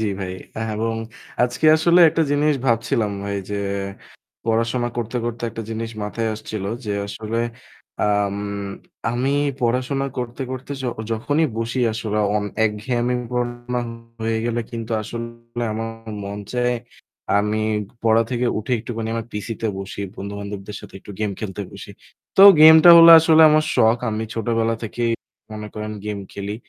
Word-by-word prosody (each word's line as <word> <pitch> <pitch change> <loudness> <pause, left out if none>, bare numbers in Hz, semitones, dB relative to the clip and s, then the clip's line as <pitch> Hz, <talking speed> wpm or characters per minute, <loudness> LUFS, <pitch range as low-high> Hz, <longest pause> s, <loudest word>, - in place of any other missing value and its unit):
জি 110 - 0 0.2
ভাই 90 -1 -4 0.2
অ্যা 110 - -4
এবং 115 +1 -1 0.5
আজকে 125 +5 +1
আসলে 170 +2 +4
একটা 165 +1 +1
জিনিস 145 +1 +2
ভাবছিলাম 115 -3 +1
ভাই 100 0 -2
যে 105 - -2 0.9
পড়াশোনা 115 +2 0
করতে, 120 0 -3
করতে 120 0 -4
একটা 115 +1 -6
জিনিস 115 0 -4
মাথায় 110 +2 -2
আসছিল 105 -2 -6 0.2
যে 105 - -3 0.2
আসলে 110 +2 -4 0.7
আম 100 -1 +1 0.7
আমি 125 +3 0 0.3
পড়াশোনা 130 +3 0
করতে, 125 +1 -4
করতে 130 +2 -6
য-যখনই 120 +6 -1
বসি 115 +3 -2
আসলে 110 -1 -2 0.2
অন 105 - -1 0.2
এক 105 - +3
ঘ্যামই 125 -1 0
পড়াশোনা 120 0 -2 0.4
হয়ে 110 0 0
গেল। 120 0 -1
কিন্তু 115 -1 -5
আসলে 115 +1 -7
আমার 115 +1 -3 0.3
মন 100 +1 -5
চায় 125 0 +1 0.6
আমি 105 +1 0 0.5
পড়া 115 0 +5
থেকে 125 0 0
উঠে 110 +4 -4
একটুখানি 115 0 -5
আমার 115 0 -3
PC 105 +1 -5
তে 115 - 0
বসি। 95 +1 -6 0.2
বন্ধু-বান্ধবদের 100 0 -6
সাথে 105 - -13
একটু 105 - -12
game 105 -2 -1
খেলতে 105 -2 -5
বসি। - - -10 0.5
তো 195 - +8 0.2
game 160 +1 +10
টা 175 - +11
হলো 165 0 +10
আসলে 160 0 +6
আমার 155 0 +4
শখ। 110 +1 +5
আমি 110 +1 -2
ছোটবেলা 115 0 0
থেকেই 115 +1 -1 0.4
মনে 105 0 -6
করেন 110 0 -5
game 105 -1 -4
খেলি 100 +1 -5
115 Hz, 155 wpm, -21 LUFS, 105-125 Hz, 0.9 s, টা